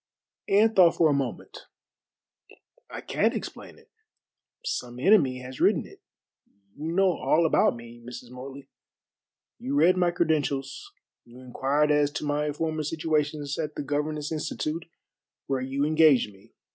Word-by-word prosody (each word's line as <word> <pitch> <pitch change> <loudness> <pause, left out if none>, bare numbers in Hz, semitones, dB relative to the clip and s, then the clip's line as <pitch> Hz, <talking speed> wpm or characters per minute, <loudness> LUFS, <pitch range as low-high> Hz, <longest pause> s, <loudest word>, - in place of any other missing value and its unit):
Anne 215 +3 +4
thought 180 -4 +6
for 160 -2 +4
a - - +2
moment. 135 -3 -4 1.2
"I - - -7
can't - - 0
explain - - -7
it. - - -23 0.7
Some 125 - -4
enemy 135 -7 +3
has 130 +1 -9
written - - +3
it. - - -16 0.7
You 155 +3 -4
know 190 +2 +3
all 155 +2 +1
about 160 - +3
me, 120 0 -12
Mrs. 120 0 -10
Morley. 135 +2 -10 0.9
You 135 +2 -3
read 170 +5 +4
my 175 -1 +3
credentials 150 -6 -1 0.3
you 120 +1 -15
inquired 140 +4 0
as 145 -1 +3
to 150 - -4
my 150 +1 0
former 155 +1 -2
situations 150 -1 -2
at 155 -1 -3
the - - -4
Governess 150 +1 -2
Institute 155 +1 -3 0.6
where 135 -2 -1
you 135 +2 -1
engaged 155 -8 +4
me. 100 +4 -22
150 Hz, 145 wpm, -26 LUFS, 135-160 Hz, 1.2 s, thought